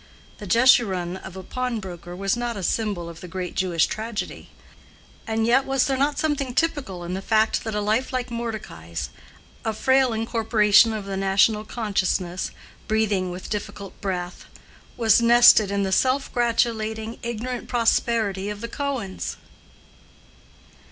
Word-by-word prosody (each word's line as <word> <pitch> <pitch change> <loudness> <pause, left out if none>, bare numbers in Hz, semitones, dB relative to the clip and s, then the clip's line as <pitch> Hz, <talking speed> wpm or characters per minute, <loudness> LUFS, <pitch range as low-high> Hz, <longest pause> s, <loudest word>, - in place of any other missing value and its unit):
This 205 - -8
Jeshurun 195 -7 +3
of 190 0 -10
a 190 - -7
pawnbroker 190 -8 -5
was 195 +3 0
not 240 -2 -3
a 195 - -5
symbol 200 -3 -1
of 165 -1 -10
the 180 - -8
great 180 0 -5
Jewish 175 -3 +2
tragedy; 220 0 -5 0.8
and 225 0 0
yet 250 +4 +4
was 270 -1 +1
there 270 - 0
not 280 +2 +1
something 285 -5 -1
typical 260 - -1
in 175 +1 -5
the 190 - -3
fact 220 +2 +2
that 220 -2 -4
a 210 - 0
life 220 +5 0
like 255 -1 -3
Mordecai's—a 220 - -6
frail 260 +3 +3
incorporation 225 -1 +3
of 215 -2 -4
the 195 -1 -4
national 200 +3 +2
consciousness, 190 -5 -1 0.4
breathing 210 -4 +1
with 180 +1 -8
difficult 200 -2 -6
breath—was 195 +4 -2
nested 235 -3 +7
in 200 0 0
the 190 - -1
self 260 +7 +1
gratulating 225 -2 0
ignorant 235 +1 -4
prosperity 225 -4 +1
of 210 0 -6
the 235 - -4
Cohens? 265 -10 -4
220 Hz, 140 wpm, -24 LUFS, 190-235 Hz, 0.8 s, nested